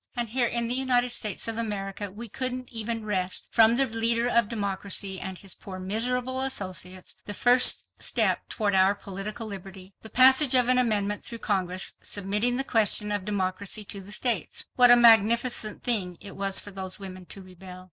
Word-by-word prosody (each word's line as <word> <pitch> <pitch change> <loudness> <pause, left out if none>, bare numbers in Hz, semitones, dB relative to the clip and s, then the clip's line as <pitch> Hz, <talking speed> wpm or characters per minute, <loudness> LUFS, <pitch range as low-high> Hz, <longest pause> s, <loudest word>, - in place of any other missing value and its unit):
And 240 -2 -2
here 245 +1 0
in 235 0 -1
the 240 - 0
United 250 -1 +2
States 215 -4 -2
of 225 0 -2
America 205 -2 -5
we 230 +4 -9
couldn't 255 +2 -4
even 225 0 -2
wrest 185 -3 -2
from 225 0 +4
the 270 +2 +3
leader 230 0 0
of 235 -3 +1
democracy 200 -2 -3
and 190 -1 -7
his 195 -1 -7
poor 190 -2 -10
miserable 250 +7 -1
associates 185 -7 -3
the 205 - -4
first 245 +3 +3
step - - +1
toward 205 -3 -2
our 190 +1 +3
political 200 +3 -7
liberty—the 195 0 -10
passage 260 +2 +6
of 250 -1 +4
an 255 0 +3
amendment 210 -4 0
through 235 - -6
Congress, 185 -3 -2
submitting 210 +5 0
the 270 - +1
question 210 -4 +2
of 205 -2 -2
democracy 200 +1 -3
to 200 0 -8
the 195 +2 -13
states! 220 -4 -2
What 245 -1 +5
a 240 - +8
magnificent 230 -1 +3
thing 190 -8 +2
it 200 -2 -9
was 195 0 +2
for 205 - -4
those 190 -1 -5
women 185 -2 -10
to 195 +4 -10
rebel! 185 0 -11
210 Hz, 180 wpm, -26 LUFS, 195-240 Hz, -, a